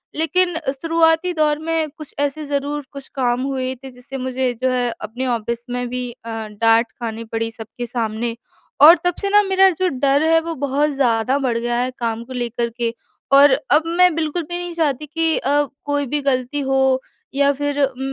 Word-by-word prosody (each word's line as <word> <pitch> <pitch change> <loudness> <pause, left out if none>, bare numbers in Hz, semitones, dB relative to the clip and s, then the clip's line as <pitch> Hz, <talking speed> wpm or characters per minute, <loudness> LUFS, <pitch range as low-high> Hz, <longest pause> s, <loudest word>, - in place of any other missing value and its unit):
लेकिन 340 +2 +1 0.2
शुरुआती 330 +1 +3
दौर 305 -2 +1
में 320 -1 -1
कुछ 305 -2 -10
ऐसे 290 +2 -1
ज़रूर 285 +1 -2
कुछ 275 -1 -10
काम 245 -2 +1
हुए 260 -1 -2
थे 265 - -8
जिससे 250 +2 -9
मुझे 255 -1 -1
जो 260 - +2
है 250 -1 0
अपने 235 +5 -4
ऑफ़िस 235 0 -2
में 245 0 -2
भी 250 0 -3
अ, 230 0 -12 0.2
डाँट 225 +2 +2
खानी 230 -1 -4
पड़ी 225 0 -3
सबके 225 +2 -7
सामने। 230 0 -2 0.5
और 320 +4 +10
तब 355 - +2
से 400 - 0
ना 415 +1 +6
मेरा 385 0 +5
जो 370 +1 -1
डर 275 +1 +2
है 325 0 +4
वो 330 0 -4
बहुत 285 +2 +1
ज़्यादा 255 -1 +1
बढ़ 250 -4 0
गया 240 +1 -1
है 255 +1 -1
काम 230 -1 -2
को 260 - -9
लेकर 240 -1 -2
के। 235 -1 -1 0.4
और 280 +1 +8 0.2
अब 300 +2 +5
मैं 355 +1 +4
बिल्कुल 325 +1 -1
भी 345 +3 -5
नहीं 350 -1 -5
चाहती 300 -3 0
कि 325 +1 0
अ, 290 +2 +2 0.2
कोई 290 -1 0
भी 295 +3 -2
ग़लती 265 0 -1
हो 265 -1 +2 0.3
या 280 +1 +3
फिर 290 +1 -2
उम, 265 -1 -1
275 Hz, 195 wpm, -20 LUFS, 245-310 Hz, 0.5 s, और